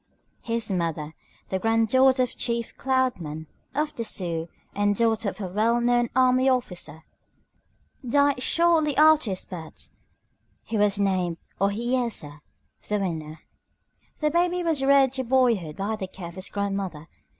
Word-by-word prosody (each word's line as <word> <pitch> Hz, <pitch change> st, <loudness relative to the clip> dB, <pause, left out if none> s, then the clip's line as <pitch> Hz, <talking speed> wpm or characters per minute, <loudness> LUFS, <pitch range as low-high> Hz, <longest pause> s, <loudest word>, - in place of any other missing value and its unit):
His 230 Hz, -2 st, -1 dB
mother, 165 Hz, -4 st, -2 dB, 0.4 s
the 190 Hz, -, -1 dB
granddaughter 255 Hz, +5 st, +3 dB
of 250 Hz, -, -4 dB
Chief 235 Hz, -1 st, -2 dB
"Cloud 260 Hz, -3 st, 0 dB
Man" 155 Hz, 0 st, -6 dB, 0.3 s
of 300 Hz, +1 st, -1 dB
the 235 Hz, -, -4 dB
Sioux 170 Hz, -6 st, -2 dB, 0.2 s
and 205 Hz, 0 st, +1 dB
daughter 225 Hz, -1 st, +1 dB
of -, -, -10 dB
a 195 Hz, -, -3 dB
well 220 Hz, +6 st, +1 dB
known 240 Hz, 0 st, +2 dB
army 255 Hz, 0 st, +4 dB
officer, 180 Hz, -10 st, -2 dB, 1.0 s
died 280 Hz, +1 st, +2 dB
shortly 325 Hz, -2 st, +2 dB
after 310 Hz, -5 st, +5 dB
his 185 Hz, -1 st, -3 dB
birth. 165 Hz, -4 st, -8 dB, 0.6 s
He 225 Hz, -, -5 dB
was 205 Hz, -1 st, +3 dB
named 185 Hz, -4 st, 0 dB, 0.2 s
Ohiyesa 210 Hz, -, -1 dB, 0.5 s
(The 210 Hz, -, +1 dB
Winner). 160 Hz, -5 st, -4 dB, 0.8 s
The 300 Hz, -1 st, 0 dB
baby 350 Hz, +2 st, +1 dB
was 320 Hz, -5 st, +1 dB
reared 270 Hz, -1 st, +5 dB
to 260 Hz, -1 st, -1 dB
boyhood 235 Hz, -11 st, +2 dB
by 205 Hz, +3 st, -2 dB
the 190 Hz, -, -4 dB
care 180 Hz, -2 st, -8 dB
of -, -, -12 dB
his 185 Hz, +1 st, -4 dB
grandmother. 195 Hz, -6 st, -3 dB
225 Hz, 145 wpm, -25 LUFS, 185-260 Hz, 1.0 s, after